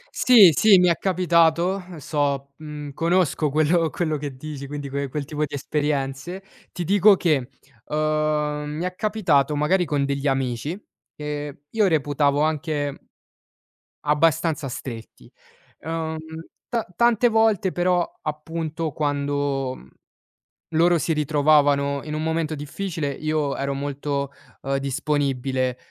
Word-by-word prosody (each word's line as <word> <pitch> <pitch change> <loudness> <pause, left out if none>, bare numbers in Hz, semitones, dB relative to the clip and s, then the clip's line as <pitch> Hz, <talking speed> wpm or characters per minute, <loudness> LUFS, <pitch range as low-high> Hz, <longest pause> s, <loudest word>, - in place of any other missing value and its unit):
Sì, 220 -9 +7
sì, 205 +6 +6
mi 180 - +4
è 170 - +3
capitato, 175 0 +2 0.2
so, 140 -1 -2
mhmm, 150 -2 -8
conosco 165 -2 +1
quello 160 +2 +2
quello 155 -3 -1
che 145 -2 -6
dici, 140 +1 -7
quindi 145 0 -6
que 140 +1 -2
quel 150 +2 -3
tipo 150 +1 -3
di - - -13
esperienze, 145 +4 -2 0.3
ti 180 - -4
dico 200 +3 +5
che, 150 -9 +1 0.4
uhm, 150 -1 0
mi 165 - -3
è 180 0 -4
capitato, 175 - +1
magari, 175 +5 +2
con 145 -3 0
degli 140 0 -2
amici 135 - -1 0.4
che 145 -1 -5
io 215 -3 +2
reputavo 145 -2 +1
anche 150 -2 -1 1.1
abbastanza 150 0 +2
stretti. 120 -3 -8 0.5
Uhm 160 0 -3 0.6
ta 230 -2 +1
tante 235 +2 +4
volte 220 -4 +2
però, 175 0 +2 0.2
appunto, 160 +1 -4
quando, 145 -2 -1
mhmm, 65 - -15 0.8
loro 170 +2 +3
si 165 +1 0
ritrovavano 145 -2 +2
in 150 0 -5
un 155 - -2
momento 160 -1 -1
difficile, 155 +1 -4
io 155 0 -1
ero 140 0 -2
molto, 140 0 -3 0.3
uhm, 135 0 -1
disponibile 135 -2 -1
150 Hz, 125 wpm, -23 LUFS, 140-165 Hz, 1.1 s, Sì